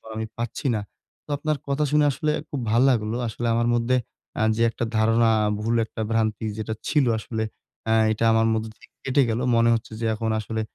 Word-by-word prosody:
আমি 110 0 -3
পাচ্ছি 120 +4 -3
না। 105 - -1 0.4
তো - - -25
আপনার 155 0 -1
কথা 140 +2 0
শুনে 150 0 +4
আসলে 150 +3 -1 0.2
খুব 140 - -3
ভাল 115 - +4
লাগলো। 110 -2 0
আসলে 115 +2 -3
আমার 120 0 +1
মধ্যে 120 +2 +1 0.4
আ - - +1
যে 115 - -2
একটা 115 +1 -3
ধারণা, 115 +1 +3 0.3
ভুল 115 +2 0
একটা 110 - -7
ভ্রান্তি 110 -1 0
যেটা 110 0 -3
ছিল 150 -3 +3
আসলে 110 0 -3 0.5
আ - - +5 0.2
এটা 110 +1 0
আমার 110 0 +3
মধ্যে 110 0 -2
থেকে - - -20
কেটে 135 +1 +2
গেল। 110 +1 0 0.2
মনে 115 0 +4
হচ্ছে 115 0 -3
যে - - -1
এখন 110 +1 -2
আসলে 110 +1 -3
115 Hz, 200 wpm, -24 LUFS, 110-125 Hz, 0.5 s, আ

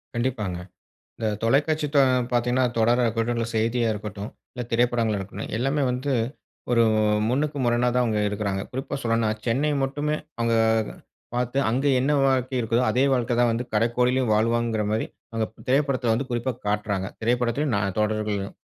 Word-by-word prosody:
கண்டிப்பாங்க. 115 -7 -1 0.6
இந்த 110 - -2 0.2
தொலைக்காட்சி 150 +6 +2
தொ - - +7 0.3
பார்த்தீங்கன்னா, 125 +1 +2
தொடரா 120 +2 +3
இருக்கட்டும், 115 +1 0
இல்ல 115 - -1
செய்தியா 115 +1 +1
இருக்கட்டும், 105 0 -6 0.2
இல்ல 125 - -5
திரைப்படங்களா 115 -3 +2
இருக்கட்டும், 100 +2 -6
எல்லாமே 135 +4 0
வந்து 130 +3 -2 0.6
ஒரு 115 -1 +5 0.5
முன்னுக்கு 145 +3 0
முரணா 120 +1 +2
தான் 125 0 +3
அவங்க 110 -3 0
எடுக்குறாங்க. 100 -2 -2
குறிப்பா 135 +2 -4
சொல்லனுனா 115 -1 +1 0.2
சென்னை 135 +6 +1
மட்டுமே, 145 +3 -1 0.2
அவுங்க 115 0 +1 0.4
அ - - -17
பார்த்து, 125 +2 -1
அங்க 130 +4 0
என்ன 140 +3 +1
வாழ்க்கை 130 -1 +1
இருக்குதோ, 115 +2 +1
அதே 130 +2 +2
வாழ்க்கை 125 -1 +1
தான் 120 -1 +4
வந்து, 115 +2 -2
கடைக்கோடியிலும் 125 +2 +2
வாழ்வாங்கிற 115 0 +1
மாரி, 110 +1 0 0.3
அங்க 115 -1 +1 0.2
திரைப்படத்துல 135 -3 +2
வந்து 130 +3 -2
குறிப்பா 120 +2 -1
காட்றாங்க. 105 -2 -1 0.2
திரைப்படத்துலையும் 120 +3 +1
நா - - +1 0.2
தொடர்கள்லயும். 105 -2 -1
120 Hz, 150 wpm, -24 LUFS, 110-130 Hz, 0.6 s, தொ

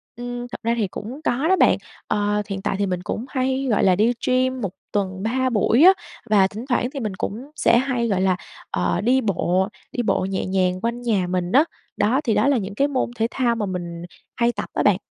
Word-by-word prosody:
Ừm, 245 0 -5
thật 245 - -8
ra 230 +1 +2
thì 215 -4 +1
cũng 235 +9 -7
có 275 +2 +1
đó 380 - +5
bạn. - - +4 0.3
Ờ, 210 0 +1
hiện 195 -1 -3
tại 195 - -1
thì 200 - +2
mình 180 -2 -2
cũng 225 - -4
hay, 265 0 -1
gọi 215 - +2
là, 185 -2 +5
đi 220 +5 +3
gym 255 0 +1
1 200 - -1 0.2
tuần 190 -2 -2
3 260 +4 +1
buổi 235 +4 +3
á. 375 +2 +9 0.4
Và 200 -3 +5
thỉnh 215 +5 -8
thoảng 245 -1 +1
thì 280 - -4
mình 215 -6 -3
cũng 230 +9 -5
sẽ 270 -6 +4
hay, 250 -2 0
gọi 195 -4 +1
là, 190 -1 +3 0.4
ờ, 175 - 0
đi 250 +5 +3
bộ, 190 -3 +1 0.2
đi 245 - -2
bộ 195 -3 +1
nhẹ 190 0 -2
nhàng 185 -1 0
quanh 235 +1 -2
nhà 210 -7 +1
mình 180 0 -1
á. 275 +7 +6 0.3
Đó, 255 +7 +2
thì 235 -7 +1
đó 215 +6 +3
là 280 -2 +3
những 200 -2 -4
cái 280 +6 +2
môn 270 -4 -1
thể 225 -1 +1
thao 240 -3 +1
mà 220 -2 -2
mình 175 -3 -5 0.3
hay 235 0 +2
tập - - -5
á - - 0
bạn. - - +4
225 Hz, 240 wpm, -22 LUFS, 195-255 Hz, 0.4 s, á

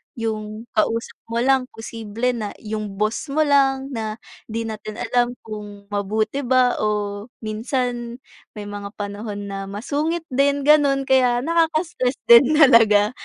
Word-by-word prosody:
'yong 215 -1 -4
kausap 225 +1 -1
mo 230 +1 -1
lang, 265 -1 +2
posible 225 +1 -3
na 220 -4 -5
'yong 215 -2 -4
boss 215 +9 -1
mo 300 +3 +1
lang, 275 -2 +2
na 220 -3 -3 0.3
'di 230 +1 -3
natin 215 -1 -6
alam 245 +2 0
kung 205 -2 -9
mabuti 215 +5 -1
ba 255 -2 +2
o 210 0 -2 0.2
minsan 240 +2 -3 0.4
may 210 - -6
mga 205 0 -7
panahon 205 0 -6
na 195 0 -5
masungit 290 +11 -2
din, 280 +2 +2
gano'n. 285 -2 +4
Kaya, 250 -2 +3
nakaka-stress 320 -5 0 0.2
din 255 +6 +8
talaga. 225 -8 +6
230 Hz, 135 wpm, -22 LUFS, 210-270 Hz, 0.4 s, din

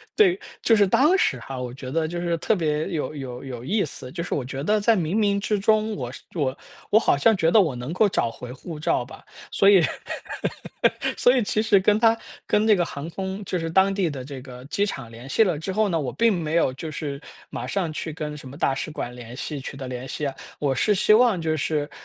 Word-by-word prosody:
对， 380 -3 +4 0.2
就 225 - +4
是 205 -1 +4
当 300 - +4
时 135 - +2
哈， 135 +1 -6
我 125 -1 -5
觉 130 -1 -7
得 160 +1 0
就 175 +1 -4
是 170 -1 0
特 215 - +1
别 155 -3 0
有 155 -5 -3
有 130 -3 -7
有 125 -3 -7
意 200 +8 +1
思， 130 -4 -5
就 170 - -4
是 - - -4
我 135 - -1
觉 135 +1 -5
得 210 +6 +2
在 225 +2 +4
冥 170 -3 -1
冥 205 -2 +2
之 210 0 0
中 215 +1 +2
我 125 -4 -4
是 - - -10
我 135 -5 -1 0.3
我 210 - +7
好 185 - +2
像 220 +10 +4
觉 165 -3 +2
得 220 - +6
我 160 -10 +2
能 125 +4 -5
够 195 +5 +3
找 120 - 0
回 125 +2 -9
护 155 +3 -8
照 140 -4 +1
吧。 130 - -13 0.3
所 195 - +5
以 190 -4 +7 1.3
所 250 +2 +5
以 245 - +3
其 215 +1 +1
实 215 -3 +4
跟 205 +2 +3
它 225 0 +4 0.3
跟 210 +1 +2
这 215 - +6
个 175 -3 +1
航 145 +1 -6
空 190 +3 -5
就 180 - -2
是 165 0 -3
当 190 +3 +4
地 190 -4 +1
的 135 -4 -6
这 135 0 -8
个 125 -1 -11
机 200 +8 0
场 135 - -6
联 120 +3 -11
系 225 - +4
了 175 -8 0
之 175 +5 -4
后 215 +1 +2
呢， 165 -3 +1
我 130 -4 -2
并 230 -1 +3
没 165 -3 -2
有 165 -6 +3
就 155 +5 -6
是 145 -2 -5 0.3
马 - - -5
上 185 -5 -1
去 155 0 -4
跟 150 -1 -5
什 140 - -10
么 130 - -10
大 140 - +1
使 135 - -4
馆 125 -5 -5
联 120 0 -9
系 145 +2 -4
取 135 - -7
得 135 -2 -6
联 125 +1 -5
系 150 - -4
啊。 140 - -2 0.3
我 140 -2 +1
是 210 +9 +2
希 215 - +4
望 225 -4 +5
就 160 -1 0
是， 150 0 -1
160 Hz, 270 characters per minute, -24 LUFS, 135-200 Hz, 1.3 s, 我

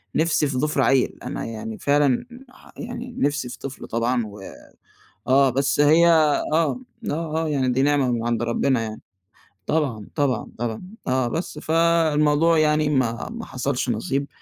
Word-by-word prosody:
نِفسي 160 -2 +2
في 135 -2 -3
ضِفر 150 +3 0
عيّل، 135 -2 +2
أنا - - -4
يعني 110 -1 -6
فعلًا 145 -3 +2 0.2
ح - - -19
يعني 245 0 -7
نِفسي 145 -3 0
في - - -9
طفل 135 -1 -7
طبعًا 115 +1 0
و 105 0 -10 0.9
آه، 135 +1 +5
بس 140 +3 0
هي 155 +4 +6
آه، 155 -3 +4
آه، 165 +8 +1 0.3
آه، 160 +1 -2
يعني 135 -3 0
دي 125 +2 +1
نعمة 140 -3 +2
من 115 -1 -2
عَند 120 -1 0
ربّنا 120 +1 +1
يعني. 110 -1 -6 0.6
طبعًا، 135 -10 -1
طبعًا، 140 -6 -1
طبعًا. 115 -1 -3 0.3
آه 130 -1 +1
بس 155 +3 -4
فالموضوع 165 -1 +3
يعني 150 0 +2
ما 125 -5 0
ما 235 0 -7
حصَلش 130 0 -2
نصيب. 135 +5 -1
140 Hz, 160 wpm, -23 LUFS, 125-155 Hz, 0.9 s, هي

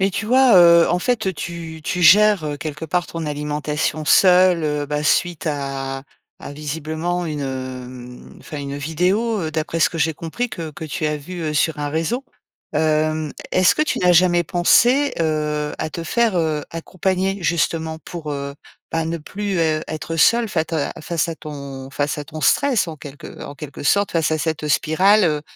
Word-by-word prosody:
Mais 195 +1 +2
tu 215 - -3
vois, 255 -3 +5
heu? 170 -1 +7
En 180 - +1
fait, 245 +1 -1
heu, - - -1
tu 165 -1 -7
tu 180 - -1
gères, 205 0 +6
heu, 145 -1 -3
quelque 155 -1 -6
part 175 +2 -1
ton 165 -1 -5
alimentation 150 +1 -2
seule, 180 +3 +5
heu, 150 -1 -1
bah 150 +1 -2
suite 175 +2 +1
à 135 -2 -3 0.4
à - - -8
visiblement 160 +4 -3
une, 150 -2 -4
hem, 130 -2 -7
enfin 150 - -8
une 140 0 -5
vidéo, 185 +9 0
heu, 160 -2 -3
d'après 160 +1 -2
ce - - +5
que 165 - -6
j'ai 160 +1 +1
compris 170 +11 -4
que, 165 -6 -6
que 155 +2 -8
tu 155 +1 -4
as 150 0 -1
vu, 175 +5 -8
heu, 155 -1 -2
sur 150 +1 +1
un 145 - -2
réseau. 165 - -2 0.5
Hem, 155 -1 +1 0.2
est-ce 185 0 +4
que 305 - +3
tu 310 - -1
n'as 180 -1 +4
jamais 175 0 +4
pensé, 245 - +3
heu, 150 -2 -1
à 155 - -3
te 170 - -5
faire, 230 +1 +1
heu, 155 -3 0
accompagner 185 +3 -2
justement 160 -1 0
pour, 160 -4 -6
heu, 140 0 -5 0.4
bah, 165 0 0
ne 165 +1 -2
plus, 200 +4 -4
heu, 155 -2 +1
être 155 +1 -5
seule, 230 +7 +4
fata 160 -4 -1
face 170 +1 -1
à 165 - -3
ton 140 -3 -8
face 145 +2 -2
à 145 - -5
ton 155 +2 -8
stress 250 - +2
en 160 - -7
quelque 145 +2 -10
en 140 - -8
quelque 145 -1 -9
sorte, 200 +7 +2
face 165 -2 +1
à 155 - 0
cette 155 -1 -2
spirale, 190 +8 +3
heu, 150 -3 0
160 Hz, 195 wpm, -20 LUFS, 150-180 Hz, 0.5 s, heu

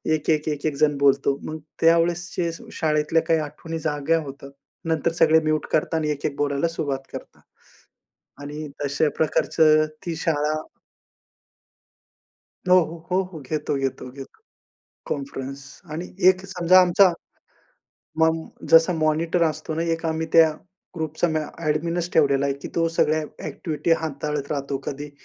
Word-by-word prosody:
1-1-1-1 150 -1 -1
जण 150 -1 +2
बोलतो. 140 0 +3
मग 155 - -5 0.2
त्यावेळेस 170 +2 +3
जे 170 -2 0 0.2
शाळेतल्या 155 0 +1
काही 165 -1 +3
आठवणी 155 +2 -6
जाग्या 155 +1 0
होतात, 140 0 -10 0.4
नंतर 160 0 +1
सगळे 160 -1 +5
म्युट 155 -1 0
करतात 160 +2 +1
आणि 150 -1 -1
1-1 145 0 -3
बोलायला 145 +2 0
सुरुवात 140 -5 -4
करतात - - -9 1.0
आणि 150 +2 -6 0.2
तशा 145 +2 +1
प्रकारचं 155 0 +3 0.2
ती 170 - -2
शाळा 155 -2 0 2.1
हो, 180 - +7
हो. 165 0 -4
हो, 185 +1 +2
हो. 160 - -7
घेतो, 150 +2 -3
घेतो, 135 -2 -3
घेतो, 135 - -12 0.7
कॉन्फरन्स 140 -1 -5 0.3
आणि 170 +4 -4 0.2
एक 185 0 +3
समजा, 185 -1 +5
आमचा 180 +1 +5 1.1
मम 160 0 +3 0.3
जसा 165 +2 +7
मॉनिटर 165 +2 +1
असतो 155 0 -2
ना, 165 - -1
एक 165 0 -2
आम्ही 160 0 -1
त्या 165 -1 +7 0.5
ग्रुपचा 160 +2 -1
म्या 155 -2 -2 0.2
ॲडमिनचं 165 +3 -1
ठेवलेला 140 -2 +3
आहे 140 - 0
की - - -5
तो 165 0 +2
सगळ्या 155 +1 +3 0.2
ॲक्टिव्हिटी 155 0 -3
हाताळत 150 -2 -3
राहतो. 140 -1 -3
कधी 145 +1 -5
155 Hz, 135 wpm, -23 LUFS, 145-165 Hz, 2.1 s, हो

